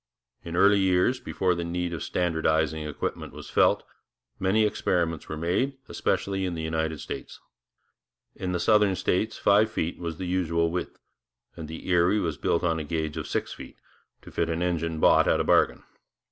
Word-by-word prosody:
In 85 0 -6
early 100 +3 +5
years, 95 +6 +2
before 95 -7 0
the 85 0 -3
need 85 +1 -2
of 85 - -5
standardizing 80 -3 0
equipment 75 - -4
was - - -10
felt, - - +3 0.6
many 100 +4 +3
experiments 85 -6 -1
were 80 - -4
made, 95 - 0
especially 95 -1 -1
in 90 -2 -2
the 80 - -4
United 80 -1 -2
States. - - -7 1.0
In 90 - -3
the 90 - -1
southern 105 +1 +4
states 105 +5 0
five 105 +2 +4
feet 80 +2 -3
was 85 -2 -4
the 95 - -4
usual 85 -2 0
width, 90 - -4 0.6
and 80 -2 -7
the 80 +1 -8
Erie 90 +3 +3
was 80 -6 -2
built 85 - 0
on 80 -2 +1
a - - -3
gauge 80 -1 -3
of - - -4
six - - -2
feet, - - -11 0.5
to - - -12
fit 85 - -1
an 85 +1 -1
engine 85 -2 -1
bought - - +5
at - - +3
a - - +2
bargain. - - +3
85 Hz, 180 wpm, -26 LUFS, 80-95 Hz, 1.0 s, early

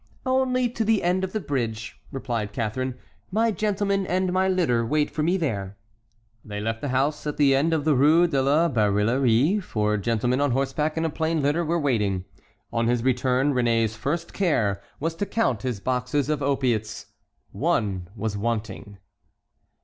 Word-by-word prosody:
"Only 255 -1 +2
to 235 -1 -2
the 220 -1 +2
end 180 +2 +1
of 190 - -2
the 215 - -2
bridge," 115 - -4
replied 115 -6 -3
Catharine; 125 +3 -2 0.3
"my 225 +3 +2
gentlemen 200 -2 0
and 185 0 0
my 190 +1 +2
litter 170 -11 +2
wait 150 +5 0
for 155 - -3
me 175 +5 +2
there." 100 - -3 0.7
They 105 -1 -6
left 110 +1 -3
the - - -2
house, 135 +4 0
and 150 - -2
at - - -20
the 140 -2 +4
end 145 +5 +2
of 155 -3 0
the 155 - +4
Rue 150 +6 +5
de 140 -6 +1
la 145 +5 +3
Barillerie 120 - +2
four 105 - -1
gentlemen 120 +5 0
on 145 -3 +2
horseback 140 +4 -1
and 165 - 0
a - - +1
plain 160 -1 -1
litter 145 +5 +1
were 170 +1 0
waiting. 105 - 0 0.5
On 115 0 +1
his 120 -1 +1
return 130 +2 +2
Réné's 115 -3 +1
first 165 +9 -3
care 115 - +1 0.2
was 160 +3 -1
to 205 - -2
count 195 - 0
his 125 -5 -3
boxes 130 +5 -1
of 150 -2 0
opiates. 125 -6 -1 0.5
One 95 -4 -1
was 110 -1 -3
wanting. 105 -2 -4
135 Hz, 175 wpm, -25 LUFS, 115-165 Hz, 0.7 s, Rue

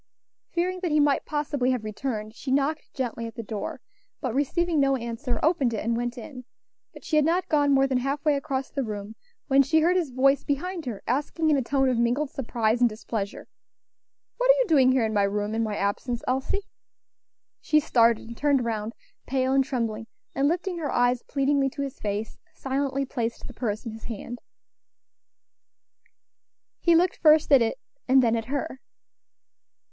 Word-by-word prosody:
Fearing 365 +2 -1
that 360 -2 -2
he 305 0 +3
might 290 -2 +2
possibly 295 -4 -1
have 250 -4 0
returned, 215 0 -4
she 260 - -7
knocked 285 +3 0
gently 235 -3 -3
at 225 - -10
the 230 - -5
door, 210 -1 -5 0.4
but 255 -6 -3
receiving 320 +4 +1
no 275 -1 +3
answer, 235 +2 -3
opened 285 -8 +2
it, 210 - -4
and 230 0 +1
went 240 +1 -3
in; 255 +2 -9 0.5
but - - -14
she 310 - +1
had 305 - +5
not 340 +4 +1
gone 290 -2 +3
more 270 0 +4
than 265 -2 +1
half 275 +4 -3
way 300 - +4
across 275 -2 -3
the 275 - -2
room 210 -1 -6 0.3
when 275 -1 +5
she 310 +4 +3
heard 350 +3 +3
his 345 -6 +1
voice 270 +2 +3
behind 325 +2 -3
her, 220 -5 -5
asking, 300 +5 0
in - - +4
a 275 - +1
tone 270 +2 +1
of 250 -2 +1
mingled 250 +5 +1
surprise 230 -3 0
and 240 - +5
displeasure, 215 -2 -5 0.9
"What - - 0
are - - +9
you - - +2
doing 270 -6 +5
here 260 -3 +2
in 220 - -2
my 205 - +3
room, 205 +1 -1
in 225 - 0
my 215 -2 -1
absence, 230 +4 -2
Elsie?" 265 +10 -1 1.0
She 305 - +3
started, 235 -7 +2
and 235 - -8
turned 280 -2 +2
round, 220 -1 -3 0.3
pale 260 0 +1
and 270 0 +4
trembling, 230 -4 -3 0.3
and 275 +1 +2
lifting 350 +2 -1
her 300 -3 -2
eyes 245 0 +2
pleadingly 275 -1 +1
to 280 - -5
his 275 0 -6
face, 210 +1 -4 0.2
silently 275 0 -1
placed 235 -3 -4
the 250 - -10
purse 225 -1 -3
in 230 - -4
his 220 +1 -11
hand. 235 +2 -6 2.4
He 340 -2 +4
looked 355 +2 +3
first 310 -1 +5
at 275 -3 +7
it, 230 - 0 0.3
and 265 0 +5
then 230 -1 +3
at 225 -1 -2
her. 265 0 -4
265 Hz, 190 wpm, -26 LUFS, 230-290 Hz, 2.4 s, are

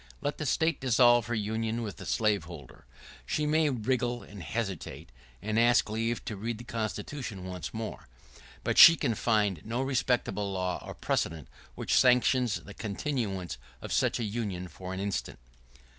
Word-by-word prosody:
Let 145 0 -3
the 155 - -2
State 160 +4 +1
dissolve 120 -2 +5
her 120 - -1
union 110 +2 -2
with 105 -4 -6
the - - -8
slaveholder. 85 - -2 0.4
She 150 - -1
may 155 0 +3
wriggle 120 -1 -1
and 105 -2 -11
hesitate, 95 - -4 0.3
and 110 +2 0
ask 120 -2 +4
leave 115 +2 -2
to 110 - -4
read 110 +3 -4
the 120 - -9
Constitution 115 -1 -4
once 90 -2 -5
more; 110 -1 -6 0.6
but - - +1
she 165 - +12
can 130 -7 0
find 105 -6 +1
no 115 +3 -3
respectable 125 -6 0
law 90 -1 -2
or - - -8
precedent 80 -4 -2 0.3
which - - +2
sanctions 125 -2 +4
the 100 - -10
continuance 100 - -3 0.2
of - - -5
such - - +2
a - - -1
union 100 -5 -3
for 90 +1 -8
an 95 - -4
instant. 100 0 -3
110 Hz, 160 wpm, -29 LUFS, 100-120 Hz, 0.6 s, she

